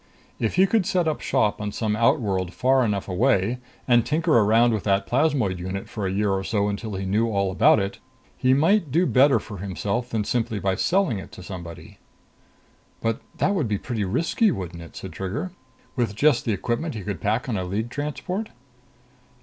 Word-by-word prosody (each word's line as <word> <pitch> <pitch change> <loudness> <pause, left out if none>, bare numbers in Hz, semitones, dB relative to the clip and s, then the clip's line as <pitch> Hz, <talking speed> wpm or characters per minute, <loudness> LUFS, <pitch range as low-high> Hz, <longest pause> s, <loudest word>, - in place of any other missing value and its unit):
If 110 - -1
he 190 - +6
could 195 -1 +1
set 180 -3 +1
up 155 - -1
shop 105 0 +1
on 105 0 -3
some 105 0 -1
outworld 105 - +1
far 130 +1 +3
enough 105 -4 -1
away, 110 +3 +1 0.3
and 120 -2 +5
tinker 160 +4 +1
around 115 +2 +4
with 105 - -2
that 100 -1 +2
plasmoid 125 - +1
unit 95 +2 -5
for 100 -3 -4
a - - -2
year 100 +1 +1
or 95 0 0
so 105 0 0
until 105 0 -4
he 95 0 -3
knew 105 +5 +1
all 100 -3 0
about 95 - +5
it, 100 0 -3 0.4
he 130 - +2
might 165 +3 +3
do 170 +6 +3
better 135 -2 +5
for 105 -6 -9
himself 100 +5 -3
than 110 -3 -1
by - - -10
simply 105 -5 0
selling 185 - +1
it - - -10
to 90 - -10
somebody." 85 -3 -9 1.0
"But 115 -1 -1 0.2
that 200 - +2
would 160 - 0
be 105 -1 0
pretty 115 0 -3
risky, 165 - +1
wouldn't 90 - -4
it?" 85 - -12
said 95 - -7
Trigger. 110 - -4 0.4
"With 115 -5 -1
just 145 +2 +3
the 115 - +1
equipment 120 - -2
he 110 - -4
could 105 0 -4
pack 110 +5 0
on 120 - -1
a 95 - -1
League 105 +6 -3
transport." 180 +9 -4
110 Hz, 200 wpm, -24 LUFS, 100-135 Hz, 1.0 s, he